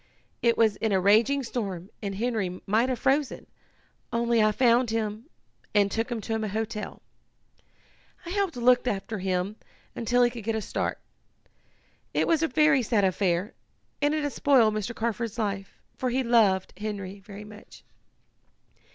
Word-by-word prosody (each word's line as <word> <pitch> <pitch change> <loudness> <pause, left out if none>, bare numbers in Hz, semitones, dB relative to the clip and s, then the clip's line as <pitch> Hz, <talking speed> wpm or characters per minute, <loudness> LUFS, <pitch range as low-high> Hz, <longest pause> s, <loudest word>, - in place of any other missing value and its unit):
It 235 -1 +3
was 220 -3 +3
in 220 - -1
a 190 - +3
raging 225 +9 +4
storm 200 -6 -4
and 200 -2 -4
Henry 205 -5 -2
might 225 +6 +2
have 255 - -1
frozen, 270 +4 0 0.7
only 235 -1 +2
I 215 0 +4
found 240 +1 +3
him 220 +3 -3 0.5
and 200 -1 +4
took 225 +4 -1
him 235 - -2
to 225 - -4
a - - -1
hotel. 215 +1 -4 1.2
I 340 - -6
helped 395 -3 0
look 245 +1 +3
after 210 -1 -2
him 185 +2 -1 0.4
until 245 +2 +2
he 240 - +3
could 235 -2 -8
get 225 +1 -1
a 220 - -1
start. - - -2 1.2
It - - +2
was 330 -2 +3
a 325 - +2
very 300 0 +4
sad 225 -3 +1
affair, 185 +2 0 0.5
and 295 +1 +2
it 305 - -1
has 290 - -2
spoiled 245 -7 +4
Mr. 215 +2 -3
Carford's 230 0 -2
life, 200 -3 -3 0.2
for 255 - -1
he 260 +2 0
loved 215 -6 +3
Henry 200 -2 -5
very 200 +1 -10
much." 210 0 -14
225 Hz, 160 wpm, -27 LUFS, 205-245 Hz, 1.2 s, raging